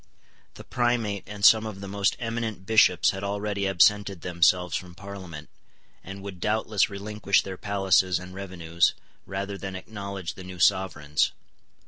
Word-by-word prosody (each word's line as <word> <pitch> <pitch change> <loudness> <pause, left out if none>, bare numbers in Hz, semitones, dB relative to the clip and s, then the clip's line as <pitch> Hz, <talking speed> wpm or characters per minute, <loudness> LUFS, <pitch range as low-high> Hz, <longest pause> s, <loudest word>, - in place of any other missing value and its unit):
The - - -10
Primate 120 -5 -1
and 105 -1 -2
some 110 0 +7
of 100 -3 -7
the 100 - -7
most 100 0 0
eminent 115 -4 -4
Bishops 100 -5 +4
had 95 +1 -7
already 100 0 -2
absented 100 0 +3
themselves 90 +1 +2
from 90 -1 -6
Parliament, 95 -5 -9 0.6
and 95 0 -9
would 95 -3 -8
doubtless 105 0 +1
relinquish 100 0 0
their 95 - -6
palaces 95 -2 +2
and 90 0 -9
revenues, 85 -3 0 0.3
rather 100 +1 -4
than 95 -1 -6
acknowledge 100 -3 -6
the 95 - -11
new 90 0 -9
Sovereigns. 75 -5 +2
100 Hz, 145 wpm, -26 LUFS, 90-105 Hz, 0.6 s, some